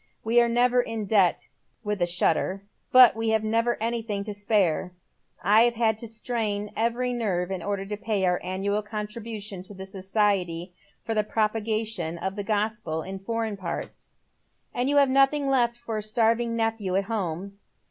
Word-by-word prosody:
We 235 +2 +4
are 235 - +2
never 245 +1 +3
in 225 -3 -4
debt," 195 -3 +2 0.4
with 210 -3 -2
a 175 - +3
shudder, 180 +2 0
" - - -46
but 255 -4 +8
we 225 0 -1
have 220 -1 +2
never 230 +2 +1
anything 225 -3 -2
to 210 0 -4
spare. 200 -4 0 0.5
I 220 +4 +5
had 220 -2 +1
to 230 - -3
strain 215 -2 -3
every 240 +2 0
nerve 190 -6 -1
in 190 -2 -3
order 200 +1 -2
to 210 +1 -5
pay 210 -3 -1
our 180 -1 +1
annual 200 +3 -1
contribution 210 -1 -6
to 195 +2 -10
the 190 0 -7
Society 190 -3 -1 0.3
for 225 - -2
the 215 -1 +2
Propagation 215 -5 -1
of 190 +3 -3
the 205 - -3
Gospel 205 -6 -1
in 190 0 -6
Foreign 225 +1 -3
Parts." 185 -3 -6 0.3
" - - -44
And 250 +2 0
you 290 - +2
have 280 -1 +6
nothing 275 +2 +3
left 240 -3 +2
for 235 -2 -5
a - - -2
starving 230 +2 +1
nephew 225 -4 -1
at 195 - +2
home." 195 -2 -4
215 Hz, 180 wpm, -26 LUFS, 195-230 Hz, 0.5 s, but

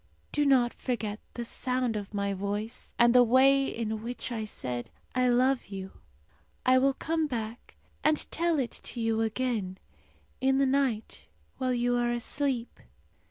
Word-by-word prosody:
Do 295 0 +1
not 250 -3 +4
forget 215 -4 -3 0.2
the 240 - -4
sound 250 -1 -1
of 205 -2 -4
my 200 0 0
voice, 205 +4 -4
and 240 0 +5
the 250 - +8
way 265 +3 +5
in 220 -2 -3
which 245 +2 -5
I 220 -2 -2
said, 125 - -4 0.2
'I 255 0 +2
love 255 +2 +2
you!' 190 -1 -7 0.7
I 255 0 +6
will 270 +1 +3
come 320 +1 0
back 230 -3 -5 0.3
and 305 0 +4
tell 335 -1 +1
it 255 -5 -1
to 240 - -7
you 225 -1 +1
again, 225 -4 -1 0.6
in 265 +1 +3
the 275 - +4
night 260 -5 0 0.3
while 255 -1 +1
you 245 0 +1
are 240 0 +1
asleep. 245 +1 -2
240 Hz, 160 wpm, -29 LUFS, 220-260 Hz, 0.7 s, the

